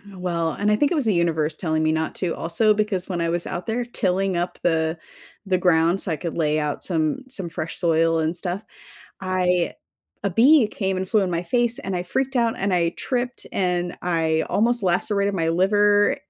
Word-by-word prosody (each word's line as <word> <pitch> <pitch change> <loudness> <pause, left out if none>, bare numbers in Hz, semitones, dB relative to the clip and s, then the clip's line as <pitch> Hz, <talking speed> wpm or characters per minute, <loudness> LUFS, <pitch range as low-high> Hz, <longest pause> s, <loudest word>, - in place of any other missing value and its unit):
Well, 170 -3 -1
and 205 +1 0
I - - +4
think 285 +7 +1
it - - +1
was 290 -5 0
the 215 - +3
universe 160 -3 0
telling 160 -2 -1
me 155 - +2
not 160 0 -2
to 180 -3 -2
also 210 +6 +2
because 205 -3 -1
when 175 -2 -2
I 170 - 0
was 170 0 -2
out 175 +1 -5
there 235 +2 -1
tilling 195 -5 -1
up 175 +1 -2
the 160 -1 +1 0.5
the 190 -1 +1
ground 175 0 +3
so 180 - 0
I - - +1
could 170 +3 -5
lay 155 -2 +1
out 150 -1 -3
some 160 - -1
some 195 -9 -3
fresh 165 0 -5
soil 165 -1 +2
and 160 +2 0
stuff, 180 +3 -2 0.6
I 180 -2 0 0.5
a 200 - +1
bee 245 - +5
came 190 -3 -2
and 185 0 -4
flew 215 - +3
in 185 -2 -1
my 170 0 -1
face 240 +5 +1
and 190 -1 -4
I 175 - -2
freaked 265 +8 -2
out 235 -2 +2
and 195 0 0
I 170 -2 +2
tripped 245 +5 -3
and 180 -2 -1
I 160 -2 +1
almost 235 +1 +1
lacerated 200 +3 +1
my 165 -4 0
liver. 205 +4 +3
180 Hz, 210 wpm, -23 LUFS, 165-205 Hz, 0.6 s, bee